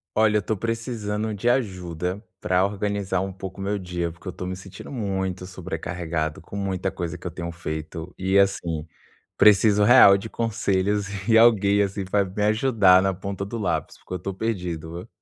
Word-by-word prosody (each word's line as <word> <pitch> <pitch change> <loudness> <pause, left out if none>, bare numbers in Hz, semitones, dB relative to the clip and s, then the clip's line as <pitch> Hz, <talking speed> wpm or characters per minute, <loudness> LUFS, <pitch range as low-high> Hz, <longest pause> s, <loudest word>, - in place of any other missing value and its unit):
Olha, 105 -1 +4
eu - - -3
tô 110 +2 -2
precisando 110 -1 -3
de 105 +4 0
ajuda 90 -6 -1 0.2
pra 90 +1 +2
organizar 100 -2 -1
um 95 - -3
pouco 95 0 -8
o - - -3
meu 100 +1 -1
dia, 90 -2 -3
porque 85 +4 -14
eu 90 - -4
tô 90 - -6
me 90 0 -4
sentindo 95 0 -11
muito 95 -6 -3
sobrecarregado 85 -3 -4
com 100 - -8
muita 95 -1 -2
coisa 90 0 -4
que 85 - -17
eu 90 - -3
tenho 85 0 -5
feito, 80 +1 -6
e 95 +1 +1
assim, 85 -5 +1 0.5
preciso 105 0 +5
real 105 -4 +8
de 100 +3 -7
conselhos 105 -3 0 0.2
e 115 - +6
alguém 105 -3 +5
assim, 100 0 -1
que 95 - -15
vai 100 -1 +3
me 95 +2 -3
ajudar 105 -4 +5
na 95 0 +1
ponta 100 +1 -5
do 110 +4 -5
lápis, 85 -7 -2
porque 90 - -7
eu - - -4
tô 95 +3 -4
perdido, 90 -6 -4
o - - -16
95 Hz, 195 wpm, -24 LUFS, 90-105 Hz, 0.5 s, real